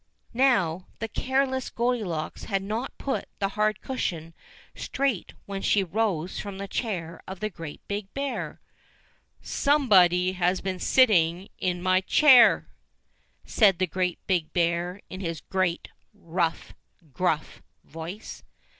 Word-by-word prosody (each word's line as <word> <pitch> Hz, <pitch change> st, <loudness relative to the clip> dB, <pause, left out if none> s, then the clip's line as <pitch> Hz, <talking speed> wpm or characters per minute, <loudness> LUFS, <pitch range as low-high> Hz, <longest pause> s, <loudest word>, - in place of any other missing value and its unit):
Now 195 Hz, -9 st, +2 dB
the 225 Hz, -, -3 dB
careless 260 Hz, +2 st, -1 dB
Goldilocks 215 Hz, -10 st, -2 dB
had 195 Hz, -2 st, -1 dB
not 220 Hz, +6 st, -4 dB
put 275 Hz, -, -2 dB
the 195 Hz, -, 0 dB
hard 215 Hz, 0 st, 0 dB
cushion 165 Hz, -, -3 dB, 0.4 s
straight 270 Hz, -8 st, -2 dB
when 195 Hz, -1 st, -5 dB
she 200 Hz, 0 st, +3 dB
rose 185 Hz, -3 st, -1 dB
from 200 Hz, -2 st, -6 dB
the 200 Hz, 0 st, -5 dB
chair 180 Hz, -7 st, -4 dB
of 190 Hz, -1 st, -7 dB
the 215 Hz, 0 st, -3 dB
Great 165 Hz, -4 st, -8 dB
Big 200 Hz, -1 st, -4 dB
Bear. 275 Hz, 0 st, -3 dB, 0.8 s
"SOMEBODY 185 Hz, -, +4 dB
HAS 180 Hz, 0 st, 0 dB
BEEN 190 Hz, -1 st, -3 dB
SITTING 185 Hz, -8 st, +3 dB
IN 180 Hz, -1 st, -1 dB
MY 185 Hz, 0 st, +3 dB
CHAIR!" 260 Hz, +5 st, +6 dB, 0.8 s
said 200 Hz, -5 st, +4 dB
the 185 Hz, -, +2 dB
Great 180 Hz, 0 st, -1 dB
Big 175 Hz, -5 st, 0 dB
Bear 175 Hz, +2 st, 0 dB
in 185 Hz, -, -6 dB
his 165 Hz, -4 st, -3 dB
great, 185 Hz, -3 st, -1 dB, 0.3 s
rough, 170 Hz, -3 st, -2 dB, 0.4 s
gruff 160 Hz, -3 st, -1 dB, 0.2 s
voice. 165 Hz, +7 st, -8 dB
190 Hz, 130 wpm, -26 LUFS, 175-220 Hz, 0.8 s, CHAIR